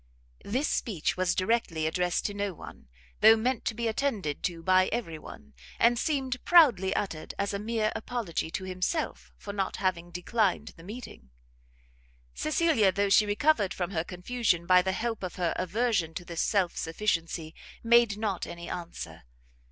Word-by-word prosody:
This 260 Hz, +8 st, -1 dB
speech 185 Hz, -9 st, -1 dB
was 185 Hz, -1 st, +1 dB
directly 185 Hz, -6 st, 0 dB
addressed 175 Hz, +2 st, 0 dB
to 205 Hz, -, -1 dB
no 200 Hz, -2 st, -3 dB
one, 65 Hz, -, -12 dB, 0.3 s
though 220 Hz, +1 st, +8 dB
meant 245 Hz, +2 st, -1 dB
to 225 Hz, -, -1 dB
be 235 Hz, 0 st, -1 dB
attended 220 Hz, -, -1 dB
to 170 Hz, -2 st, -3 dB
by 185 Hz, 0 st, +4 dB
every 170 Hz, -9 st, -3 dB
one, 70 Hz, -, -12 dB, 0.2 s
and 235 Hz, 0 st, +4 dB
seemed 265 Hz, -4 st, -1 dB
proudly 245 Hz, -, +5 dB
uttered 165 Hz, -6 st, -3 dB
as 200 Hz, +1 st, -1 dB
a 200 Hz, -, -2 dB
mere 215 Hz, 0 st, 0 dB
apology 220 Hz, -8 st, -3 dB
to 190 Hz, -, -4 dB
himself 185 Hz, -, -3 dB
for 200 Hz, -, -7 dB
not 195 Hz, -2 st, -2 dB
having 180 Hz, -3 st, -1 dB
declined 185 Hz, +4 st, 0 dB
the -, -, -15 dB
meeting. 205 Hz, -, -9 dB, 1.0 s
Cecilia, 215 Hz, -, +2 dB
though 200 Hz, +2 st, 0 dB
she 210 Hz, +2 st, +5 dB
recovered 210 Hz, -1 st, +2 dB
from 180 Hz, 0 st, -3 dB
her 160 Hz, -4 st, -1 dB
confusion 180 Hz, 0 st, -1 dB
by 180 Hz, +1 st, +6 dB
the 190 Hz, +1 st, -1 dB
help 225 Hz, +1 st, -2 dB
of 185 Hz, -2 st, -5 dB
her 175 Hz, -2 st, 0 dB
aversion 185 Hz, -3 st, 0 dB
to 175 Hz, -, -5 dB
this 170 Hz, -1 st, -3 dB
self 190 Hz, -5 st, +1 dB
sufficiency, 165 Hz, -3 st, -2 dB, 0.3 s
made 235 Hz, -3 st, +4 dB
not 210 Hz, -4 st, -2 dB
any 170 Hz, 0 st, -8 dB
answer. 170 Hz, -1 st, -7 dB
195 Hz, 165 wpm, -28 LUFS, 175-230 Hz, 1.0 s, though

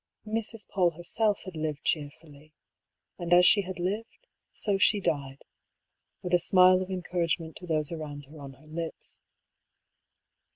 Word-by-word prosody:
Mrs. 220 Hz, 0 st, -3 dB
PauU 175 Hz, -4 st, +1 dB
herself 205 Hz, +4 st, 0 dB
had 185 Hz, -3 st, -9 dB
lived 155 Hz, -2 st, -3 dB
cheerfully; 150 Hz, 0 st, -4 dB, 0.7 s
and 175 Hz, 0 st, -5 dB
as 175 Hz, 0 st, +7 dB
she 205 Hz, -, +6 dB
had 185 Hz, -1 st, -7 dB
lived, 210 Hz, -, -4 dB, 0.3 s
so 200 Hz, -2 st, 0 dB
she 205 Hz, +2 st, +4 dB
died 140 Hz, -6 st, -3 dB, 0.4 s
— -, -, -52 dB
^with 180 Hz, -, -4 dB
a 175 Hz, -, +6 dB
smile 185 Hz, +1 st, +5 dB
of 185 Hz, -, -5 dB
encourage 175 Hz, -2 st, -1 dB
ment 160 Hz, -2 st, -10 dB
to 180 Hz, -, -10 dB
those 155 Hz, -2 st, 0 dB
around 150 Hz, -3 st, -6 dB
her 150 Hz, +3 st, -14 dB
on 140 Hz, -1 st, -9 dB
her 135 Hz, +4 st, -20 dB
lips. 160 Hz, +1 st, -7 dB
175 Hz, 160 wpm, -28 LUFS, 155-185 Hz, 0.7 s, as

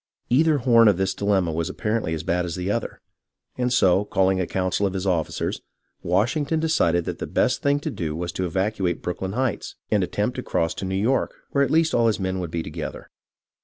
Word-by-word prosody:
Either 155 Hz, +4 st, +4 dB
hoTn 115 Hz, -3 st, +5 dB
of 100 Hz, -, +2 dB
this 95 Hz, 0 st, 0 dB
dilemma 100 Hz, -4 st, +1 dB
was 85 Hz, +2 st, -2 dB
apparently 105 Hz, -1 st, -2 dB
as 80 Hz, -, -5 dB
bad 90 Hz, +2 st, 0 dB
as 85 Hz, -2 st, -4 dB
the 90 Hz, +2 st, -2 dB
other, 115 Hz, +2 st, -3 dB, 0.6 s
and, 125 Hz, 0 st, -1 dB
so, 95 Hz, -5 st, +4 dB
calling 95 Hz, -2 st, +1 dB
a 90 Hz, -, -2 dB
council 95 Hz, +2 st, 0 dB
of 95 Hz, -, -4 dB
his 95 Hz, 0 st, -2 dB
officers, 85 Hz, -4 st, -1 dB, 0.4 s
Washing 105 Hz, -, +1 dB
ton 160 Hz, +3 st, -1 dB
decided 85 Hz, -, +2 dB
that -, -, -4 dB
the -, -, -4 dB
best 125 Hz, -, +1 dB
thing 145 Hz, 0 st, +2 dB
to -, -, -3 dB
do 80 Hz, -3 st, -3 dB
was 85 Hz, +1 st, -3 dB
to 95 Hz, +1 st, -2 dB
evacuate 95 Hz, 0 st, -1 dB
Brooklyn 95 Hz, +2 st, -3 dB
Heights, 130 Hz, -3 st, -2 dB, 0.2 s
and -, -, +3 dB
attempt -, -, -2 dB
to -, -, -2 dB
cross 80 Hz, -1 st, -1 dB
to -, -, -5 dB
New 95 Hz, 0 st, -2 dB
York, 125 Hz, +6 st, +1 dB, 0.2 s
where 140 Hz, -, +3 dB
at -, -, 0 dB
least 160 Hz, 0 st, +2 dB
all 115 Hz, -1 st, +3 dB
his 110 Hz, -, +1 dB
men 95 Hz, -1 st, -2 dB
would 90 Hz, -2 st, -4 dB
be 80 Hz, 0 st, -3 dB
together. 80 Hz, +1 st, -7 dB
95 Hz, 220 wpm, -24 LUFS, 90-120 Hz, 0.6 s, hoTn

